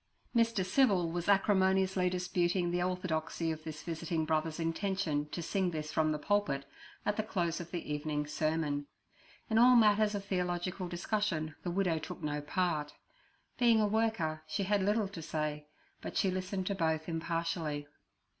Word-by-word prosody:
Mr. 230 -5 +3
Civil 185 -6 +3
was 175 +2 -2
acrimoniously 190 -2 +3
disputing 180 -1 0
the 175 0 0
orthodoxy 165 -2 -1
of 155 0 -6
this 155 -1 -7
visiting 165 -1 -2
brother's 155 +1 0
intention 165 -3 -1
to 170 - -4
sing 190 +1 0
this 155 -2 -4
from 155 -1 +2
the 150 - 0
pulpit 150 -5 0 0.4
at 210 - 0
the - - +2
close 180 -5 -1
of 170 -1 -7
the 170 -4 -4
evening 150 0 -2
sermon. 150 -1 -1 0.6
In 220 0 +3
all 250 +1 +8
matters 210 -2 +5
of 200 -1 -4
theological 180 -1 -2
discussion 175 -3 -1
the 180 - -3
widow 175 -3 +1
took - - -8
no 150 -1 -1
part; 150 -1 -1 0.6
being 235 -2 +5
a 215 - +4
worker, 210 -8 0
she 200 - -1
had 200 +1 +2
little 205 +2 +2
to 190 -4 -8
say, 150 -1 -3 0.3
but - - -5
she 190 - +2
listened 185 +1 -2
to 200 - 0
both 160 -4 0
impartially. 165 -2 -2
175 Hz, 165 wpm, -33 LUFS, 155-195 Hz, 0.6 s, all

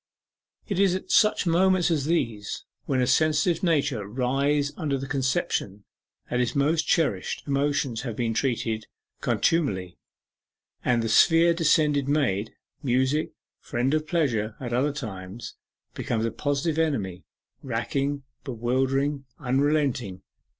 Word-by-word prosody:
It 200 -4 -2
is 195 -2 +4
at 190 - -5
such 210 -2 +4
moments 180 +1 +3
as 150 -4 0
these, 115 -11 -2 0.2
when 130 -2 +1
a - - +2
sensitive 155 +5 +2
nature 140 - +1
writhes 140 +5 0
under 145 -5 -1
the 135 - -5
conception 130 -7 -1 0.4
that 125 - -1
its 125 - -1
most 150 +3 +2
cherished 105 - 0
emotions 140 -4 0
have 120 -4 -5
been 115 -1 -1
treated 115 -2 0
with 110 - -26
contumely, 95 - 0 0.8
that 120 -1 +2
the 115 - -1
sphere 165 +8 +5
descended 150 -4 +2
Maid, 115 -8 +1 0.3
Music, 130 +4 +1 0.3
friend 125 +4 -1
of 155 0 0
Pleasure 120 -11 0
at 120 -3 -5
other 135 +5 +2
times, 110 -6 -7 0.4
becomes 115 -1 -2
a 115 - -1
positive 150 +2 -1
enemy 100 - -1 0.4
racking, 135 +3 -2 0.2
bewildering, 135 +3 -1
unrelenting. 135 -7 0
135 Hz, 130 wpm, -26 LUFS, 115-155 Hz, 0.8 s, sphere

